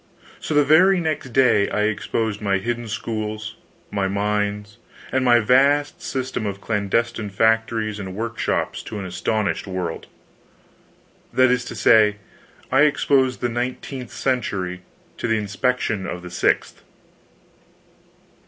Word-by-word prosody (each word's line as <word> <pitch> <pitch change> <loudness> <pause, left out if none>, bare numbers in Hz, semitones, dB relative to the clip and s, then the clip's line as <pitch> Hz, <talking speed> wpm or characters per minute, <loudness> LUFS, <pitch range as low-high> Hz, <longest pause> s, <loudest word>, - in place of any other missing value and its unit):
So, 155 - -3
the 145 - +6
very 180 +6 +5
next 155 -5 -2
day 120 -5 +4
I 105 - 0
exposed 110 0 -1
my 100 -2 +1
hidden 120 +3 -3
schools, 110 0 -4 0.4
my 100 -2 0
mines, 105 +1 -2 0.3
and 130 0 +1
my 120 -2 +5
vast 140 +5 +3
system 130 -4 -3
of 100 -1 -4
clandestine 110 +1 -1
factories 110 +1 +1
and 95 -2 -6
workshops 115 +1 -2
to 110 - -6
an 100 - -5
astonished 100 +3 -1
world. 90 -3 -4 1.2
That 130 -1 +4
is 125 0 +1
to - - -7
say, 105 -2 +5 0.6
I 130 +2 +4
exposed 135 -3 +2
the 120 - 0
nineteenth 125 +1 -4
century 95 -9 -2 0.4
to - - -2
the 110 -1 +2
inspection 105 -1 -1
of 90 - -6
the 90 - -9
sixth. 90 - 0
110 Hz, 130 wpm, -22 LUFS, 105-125 Hz, 1.2 s, the